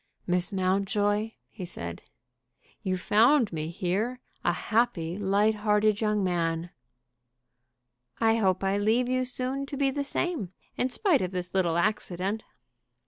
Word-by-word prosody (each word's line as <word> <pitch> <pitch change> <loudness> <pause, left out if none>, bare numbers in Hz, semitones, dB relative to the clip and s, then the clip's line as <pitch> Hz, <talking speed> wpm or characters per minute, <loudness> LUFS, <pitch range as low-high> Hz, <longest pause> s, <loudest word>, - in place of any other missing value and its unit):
"Miss 180 0 +2
Mountjoy," 205 +3 +1 0.2
he 200 - -8
said, 85 - -5 0.8
"you 185 -1 -1
found 230 - +4
me 155 -1 -3
here 195 +8 -1 0.3
a - - +3
happy, 185 -7 0
light 205 +2 +2
hearted 210 0 +2
young 210 -2 +1
man." 170 -1 -1 1.5
"I 225 0 +3
hope 190 -3 +1
I 195 +1 +1
leave 225 +4 +2
you 255 0 +1
soon 255 +2 -2
to 280 - -5
be 275 -1 +2
the 285 +1 -2
same, 280 - -2 0.2
in 255 - 0
spite 350 - +2
of 185 - -1
this 180 -1 -5
little 175 -3 +2
accident." 195 +1 -1
205 Hz, 140 wpm, -28 LUFS, 185-230 Hz, 1.5 s, found